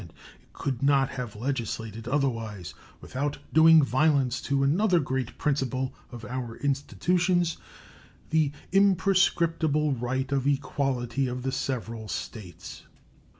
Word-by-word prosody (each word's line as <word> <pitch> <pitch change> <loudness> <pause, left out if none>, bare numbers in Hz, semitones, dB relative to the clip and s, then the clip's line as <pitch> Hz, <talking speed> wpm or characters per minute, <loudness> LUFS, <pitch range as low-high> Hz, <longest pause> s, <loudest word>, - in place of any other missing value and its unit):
It 85 -4 -12 0.4
could 130 -4 -4
not 140 -1 +3
have 125 -4 -6
legislated 115 -2 -4
otherwise 115 - -2 0.3
without 145 +3 -3 0.2
doing 160 0 +7
violence 135 -2 +2
to 140 -1 0
another 175 +6 +3
great 130 -4 -3
principle 130 -3 -1 0.2
of 120 -2 -8
our 125 0 -5
institutions 175 +6 0 0.7
the 155 -3 +3 0.2
imprescriptible 170 -6 +3
right 130 +2 -2
of 135 -1 +1
equality 135 -2 0
of 125 0 -4
the 135 - -1
several 115 -5 -3
States. 95 -5 -7
135 Hz, 110 wpm, -27 LUFS, 120-150 Hz, 0.7 s, doing